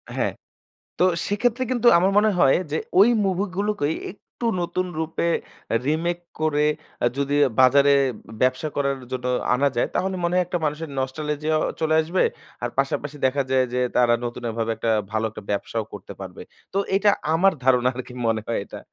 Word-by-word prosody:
হ্যাঁ, - - 0 0.6
তো - - +2 0.2
সেক্ষেত্রে 245 +5 +1
কিন্তু 240 -1 +2
আমার 185 +3 +3
মনে 215 +1 +5
হয় 135 - +5
যে 155 - 0 0.2
ওই 205 +4 +7 0.2
মুভি 190 +1 0
গুলোকেই 200 -7 0 0.2
একটু 205 +4 -10 0.2
নতুন 185 +1 -1
রূপে 160 +1 -1 0.6
রিমেক 165 +3 0 0.2
করে 150 -1 +2 0.4
এ - - +5
যদি 140 0 0 0.2
বাজারে 140 +2 +6 0.5
ব্যবসা 130 +4 +2
করার 140 -1 0
জন্য 125 -1 -4 0.3
আনা 140 +3 +2
যায়। 120 - +1
তাহলে 190 0 0
মনে 170 +1 0
হয় 180 0 +3
একটা 175 +1 -2
মানুষের 150 +1 -3
নস্টালজিয়াও 150 +3 -1 0.2
চলে 155 0 +2
আসবে। 170 +4 0 0.4
আর 120 - 0
পাশাপাশি 140 +2 -1
দেখা 135 +2 +2
যায় 130 -1 +3
যে, 125 - 0 0.2
তারা 120 -1 +4
নতুনভাবে 115 -1 -3
একটা 115 0 0 0.2
ভালো 110 0 0
একটা 105 - -10
ব্যবসাও 110 +2 -2
করতে 100 0 -9
পারবে। 95 -2 -8 0.3
তো - - 0 0.2
এটা 205 +1 +4 0.2
আমার 190 +4 +4
ধারণা 125 -1 +4
আর 130 - -3
কি 125 - -11
মনে 110 -1 +1
হয় 115 - 0
এটা? - - -9
145 Hz, 170 wpm, -23 LUFS, 125-175 Hz, 0.6 s, ওই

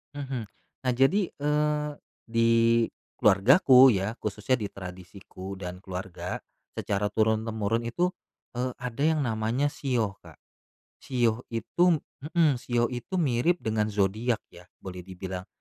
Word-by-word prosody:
Mhm. 130 -5 -4 0.4
Nah - - +4
jadi, 180 +10 +3
eee, 150 0 0 0.4
di 115 0 +2 0.7
keluargaku 130 - +7
ya, 100 +1 -1
khususnya 105 +4 0
di 105 - -2
tradisiku 95 +1 -9
dan 90 -1 -7
keluarga, 95 0 -5 0.4
secara 105 +1 -1
turun-temurun 110 0 0
itu, 175 +9 0 0.4
eee, 125 +1 -1
ada 125 +1 -3
yang 160 0 +3
namanya 115 +4 0
shio, 120 -8 -1
Kak. - - -14 0.6
Shio 120 -3 0
itu 165 +10 +2 0.4
mhm, 150 -7 +4
shio 120 -1 +1
itu 125 +9 -5
mirip 160 +1 +2
dengan 110 -1 0
zodiak 105 +3 0
ya 90 0 -15 0.2
boleh 90 -1 -7
dibilang, 95 +1 -7
115 Hz, 125 wpm, -27 LUFS, 100-135 Hz, 0.7 s, keluargaku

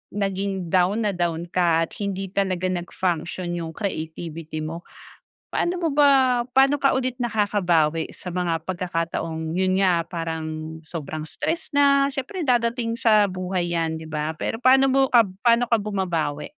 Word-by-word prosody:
naging 195 -3 -2
down 190 +5 +2
na 205 - +1
down 170 -2 -1
ka 170 -2 +2
at - - -6
hindi 195 -1 -3
talaga 185 -2 0
nag-function 175 0 -2
yung 165 -1 -5
creativity 160 -4 -5
mo? 165 +2 -6 0.7
Paano 350 +1 -1
mo 330 - +1
ba 265 -4 +4
paano 270 +2 +5
ka 275 0 +3
ulit 255 -1 -2
nakakabawi 185 -9 +1
sa 180 - -9
mga 170 -2 -1
pagkakataong 165 -2 -3
yun 190 0 +2
nga, 175 -3 +3
parang 160 -2 -5
sobrang 155 -1 -5
stress 315 - -3
na, 280 -1 +5
siyempre 290 +6 -4
dadating 235 -1 +1
sa 215 -2 +5
buhay 180 -1 -2
'yan, 165 -1 0
di 160 - -9
ba? 155 0 -3
Pero 225 - -3
paano 265 +1 +6
mo 270 - +4
ka 235 -2 +6 0.2
paano 235 0 +4
ka 230 - +5
bumabawi? 175 -8 -2
185 Hz, 150 wpm, -23 LUFS, 165-230 Hz, 0.7 s, paano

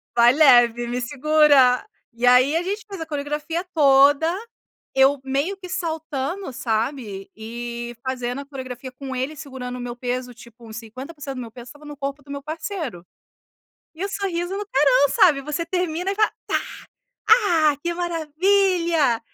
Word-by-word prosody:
vai 240 0 +6
leve, 240 -5 +5
me 245 +1 -3
segura". 285 0 +4 0.3
E 235 +1 -2
aí 255 +5 +5
a 335 - +2
gente 405 +4 -4
faz 390 -5 -8
a - - -3
coreografia 300 +3 -3
toda, 285 +2 +5 0.6
eu 270 +1 +4
meio 280 +9 -1
que 370 -2 -10
saltando, 320 0 -3
sabe, 225 -4 -3
e 235 +2 -6
fazendo 250 +1 -3
a - - -10
coreografia 260 -2 -8
com 265 0 -7
ele 265 +5 -3
segurando 260 -3 -7
o - - -8
meu 240 0 -5
peso, 250 0 -4
tipo 235 0 -15
uns 220 0 -8
50% 270 +5 -8
do 255 - -5
meu 230 -2 -8
peso 240 0 -11
estava 295 +3 -14
no 295 -1 -9
corpo 280 0 -5
do 280 - -12
meu 280 0 -5
parceiro, 315 - -5 0.9
e 355 +5 -4
o - - -2
sorriso 380 -1 -3
no 415 0 -4
carão, 275 -4 +4
sabe. 300 -5 +4
Você 300 +4 -3
termina 360 +1 -1
e - - -4
fala: 430 0 +2
"Tá! - - +1 0.7
Ah! 335 - +5
Que 345 - -1
maravilha!". 340 - +1
280 Hz, 165 wpm, -22 LUFS, 250-330 Hz, 0.9 s, vai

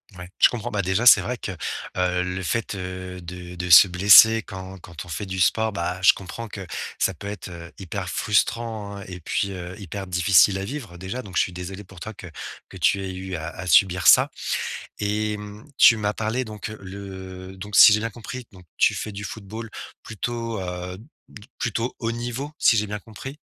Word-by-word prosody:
Ouais, 90 0 -9
je - - +8
comprends, 120 0 -5
bah, 100 -1 0
déjà 95 +6 0
c'est 120 - +9
vrai 125 0 -3
que, 100 - -5 0.5
heu, 90 0 +1
le 90 +1 -4
fait 105 +3 -2
de 90 0 -6 0.4
de 90 +1 -4
se 90 +3 +9
blesser 105 +5 +8
quand 95 0 -9
quand 85 -3 -10
on 90 - -14
fait 90 +6 -4
du 95 0 -5
sport, 110 +2 +2
bah, 90 0 -3
je 95 - +7
comprends 100 +5 -8
que 100 -2 -8 0.3
ça 95 - +1
peut 100 +4 -9
être, 100 -2 -6
heu, 85 -1 -10
hyper 95 0 -5
frustrant, 105 0 -1
hein 100 - -8
et 90 -1 -7
puis, 100 +4 -2
heu, 90 0 -7
hyper 95 0 -7
difficile 90 +2 +4
à - - -4
vivre 110 -7 -7
déjà, 95 +8 -5
donc 95 -5 -11
je - - +4
suis 90 - -1
désolé 90 +3 -7
pour 95 -1 -15
toi 110 +5 -7
que 90 - -11 0.4
que - - -11
tu 100 - +2
aies 95 -1 -5
eu 95 0 -6
à 80 0 -5
à 90 +2 -8
subir 90 0 +4
ça - - +7 0.7
et 105 +1 -1
mmh, 105 +1 -10
tu 115 - +8
m'as 105 -1 -1
parlé 115 +4 -2
donc 105 -2 -7
le 95 -1 -9
donc 100 +2 -4
si 105 - +10
j'ai 105 - +2
bien 115 - -2
compris, 120 +2 -8
donc 90 -2 -16
tu - - +4
fais 105 - -5
du 100 0 -6
football 110 +3 -7 0.3
plutôt, 115 0 -4
heu, 90 0 -5 0.3
d 105 +3 -13
plutôt 120 +1 -2
haut 115 -1 -1
niveau, 120 +5 -4
si 115 - +5
j'ai 105 -1 +1
bien 105 0 -4
compris? 125 +8 -10
100 Hz, 210 wpm, -24 LUFS, 90-110 Hz, 0.7 s, si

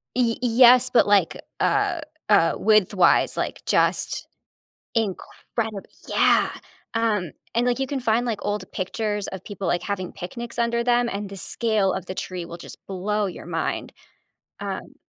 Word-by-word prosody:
Y 240 -2 +2
y 250 - +1 0.2
yes, 250 +1 +7
but, 235 - +4
like, 200 -5 +3 0.2
uh 400 -5 +1 0.3
uh, 195 -5 +5
width-wise, 210 -3 +4
like, - - -3
just - - +1 0.7
incredib 220 0 -3 0.2
Yeah, - - +3 0.4
um, 210 -7 +1 0.2
and, 235 +1 +2
like, 245 +1 +1
you 270 - 0
can 275 0 -3
find, 235 +1 +1
like, 225 -3 -1
old 205 0 -2
pictures 205 +2 -2
of 190 -1 -7
people, 200 -4 -5
like, 175 - +1
having 185 -3 -3
picnics 235 +7 -7
under 235 0 +1
them, 240 0 +2
and 200 -1 -4
the 195 - -8
scale 210 -1 0
of 185 -1 -4
the 185 - -6
tree 180 -2 -4
will 170 0 -8
just - - -12
blow 205 +2 -1
your 180 - -7
mind. - - -3 0.7
Um - - -5
210 Hz, 160 wpm, -24 LUFS, 190-235 Hz, 0.7 s, yes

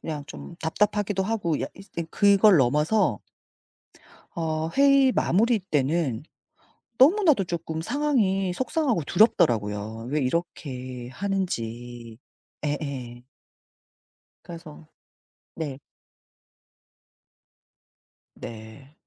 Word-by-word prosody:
그냥 150 -3 -5
좀 170 - -10
답답하기도 205 +3 0
하고 190 -7 -1
약 - - -3
이제 190 -4 -7
그걸 200 -1 +5
넘어서 150 - +2 1.2
어 160 -1 -2
회의 275 -1 +5
마무리 225 +2 +2
때는 150 -6 -1 0.8
너무나도 305 - +5
쪼끔 165 -2 -4
상황이 195 - 0
속상하고 260 - 0
두렵더라고요. 110 - +2
왜 150 +1 +1
이렇게 130 -4 -4
하는지. 120 - -4 0.5
예예. 140 -5 -4 1.2
그래서 165 -2 -11 0.7
네. 145 -4 -5 2.5
네. 110 +5 -11
165 Hz, 185 characters per minute, -25 LUFS, 130-200 Hz, 2.5 s, 그걸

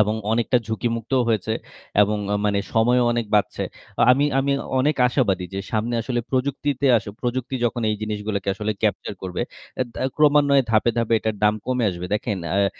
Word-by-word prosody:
এবং 105 +1 0 0.2
অনেকটা 120 +2 +2
ঝুঁকিমুক্তও 115 +3 -1
হয়েছে 110 -1 0 0.5
এবং 105 +1 +1
আ - - +2
মানে 100 -1 +2
সময়ও 120 +2 +3
অনেক 120 -1 -1
বাঁচছে। 105 - +1 0.4
আ - - +5
আমি 140 +3 +2
আমি 140 +1 +1 0.3
অনেক 150 +2 +1
আশাবাদী 100 -8 +1
যে - - -2
সামনে 115 +2 0
আসলে 120 0 -1
প্রযুক্তিতে 140 +1 0
আস - - -1 0.2
প্রযুক্তি 125 +1 -2
যখন 120 0 -1
এই 105 - -1
জিনিসগুলোকে 105 -2 -3
আসলে 105 +2 -2
capture 105 -1 -1
করবে, 90 -1 -3 0.4
এ - - +5
দা - - -4
ক্রমান্বয়ে 145 -2 +5
ধাপে, 110 +1 +3
ধাপে 115 0 +2
এটার 110 -1 -2
দাম 105 - +4
কমে 125 -2 0
আসবে। 90 0 -6
দেখেন 105 0 -2
অ্যা 100 +4 +2
115 Hz, 180 wpm, -23 LUFS, 105-130 Hz, 0.5 s, আ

